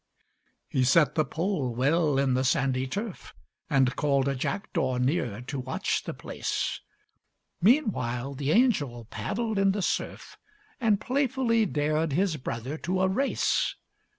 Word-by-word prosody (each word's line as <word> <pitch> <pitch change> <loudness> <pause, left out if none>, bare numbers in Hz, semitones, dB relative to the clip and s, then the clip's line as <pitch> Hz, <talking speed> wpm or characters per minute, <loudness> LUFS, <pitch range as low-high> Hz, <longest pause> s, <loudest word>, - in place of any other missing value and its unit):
He 130 - +1
set 145 +2 +4
the 155 - +2
pole 150 - -2
well 145 +3 +2
in 135 -1 +2
the 130 +1 +1
sandy 130 0 +1
turf, 205 - -6 0.3
And 135 -3 +3
called 140 -2 +1
a 140 - +1
jackdaw 135 -1 -2
near 125 - 0
to 130 +2 -5
watch 130 +1 -1
the - - -4
place. - - -3 0.8
Meanwhile 140 - +2
the 140 +1 -3
angel 150 - +2
paddled 220 -1 -2
in 195 -1 +3
the 200 -1 -2
surf, - - -3 0.4
And 220 -5 +2
playfully 250 -4 +1
dared 155 0 0
his 180 0 +1
brother 130 +3 -5
to 185 +1 -1
a 190 - +4
race. 265 +9 +1
150 Hz, 140 wpm, -27 LUFS, 130-200 Hz, 0.8 s, set